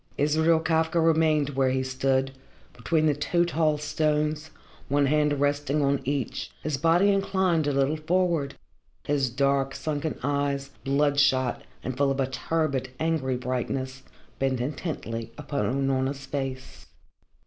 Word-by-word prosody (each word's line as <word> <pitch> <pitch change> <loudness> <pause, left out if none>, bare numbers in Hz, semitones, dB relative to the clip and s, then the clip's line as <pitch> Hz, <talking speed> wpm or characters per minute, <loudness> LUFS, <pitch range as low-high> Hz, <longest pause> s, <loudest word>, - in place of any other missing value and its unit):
Israel 160 +3 +3
Kafka 160 +1 +1
remained 160 -3 +3
where 135 -1 +1
he 130 0 0
stood, 130 0 0 0.4
between 160 -2 0
the 150 - +4
two 170 +4 +1
tall 160 -3 +1
stones, 150 +1 -1 0.4
one 145 +1 +3
hand 150 0 +2
resting 145 +1 +1
on 140 0 +1
each, 140 -3 -2
his 155 -2 -1
body 165 +7 +3
inclined 190 -5 +1
a - - +2
little 140 +2 +1
forward, 165 -3 0 0.5
his 140 -3 +1
dark, 135 +2 +1
sunken 155 0 -3
eyes, 140 0 -1
bloodshot 140 -2 +2 0.2
and 130 +1 -3
full 140 0 +3
of 135 0 -1
a 135 - +3
turbid, 135 0 -1
angry 155 -6 0
brightness, 130 +1 -3 0.4
bent 135 -2 0
intently 120 -5 -4
upon 145 - -2
Unorna's 135 0 -1
face. 135 -2 -5
145 Hz, 135 wpm, -26 LUFS, 135-155 Hz, 0.5 s, the